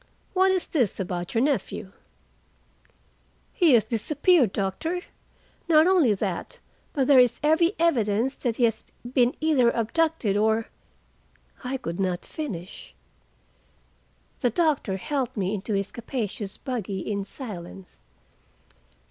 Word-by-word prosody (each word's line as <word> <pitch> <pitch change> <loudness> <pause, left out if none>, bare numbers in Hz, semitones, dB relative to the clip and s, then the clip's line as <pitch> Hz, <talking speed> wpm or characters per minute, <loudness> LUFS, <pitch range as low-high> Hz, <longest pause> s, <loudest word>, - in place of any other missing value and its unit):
What 380 0 +4
is 370 -2 0
this 250 - 0
about 175 +1 -4
your 230 - +3
nephew?" 260 -8 -2 1.6
"He 340 - +4
has 230 -3 +6
disappeared, 275 - +2
doctor. 210 - -2 0.7
Not 315 -1 +6
only 340 - +4
that, 200 - -4 0.3
but 270 -3 0
there 270 -1 +6
is 250 -2 +4
every 335 +5 +3
evidence 245 -6 +1
that 240 -4 -2
he 245 - 0
has 225 -2 +1 0.3
been 245 -1 +3
either 295 -6 +3
abducted, 235 -1 0
or—" 220 +2 +1 0.9
I 260 +1 -2
could 170 -7 -6
not 185 -2 -1
finish. 195 - -7 1.4
The 245 - +2
doctor 280 - 0
helped 270 +2 -3
me 190 0 -1
into 210 +1 -2
his 195 0 -2
capacious 225 -4 -5
buggy 210 -7 -4
in 200 0 -3
silence. 195 -5 -9
235 Hz, 125 wpm, -25 LUFS, 200-300 Hz, 1.6 s, has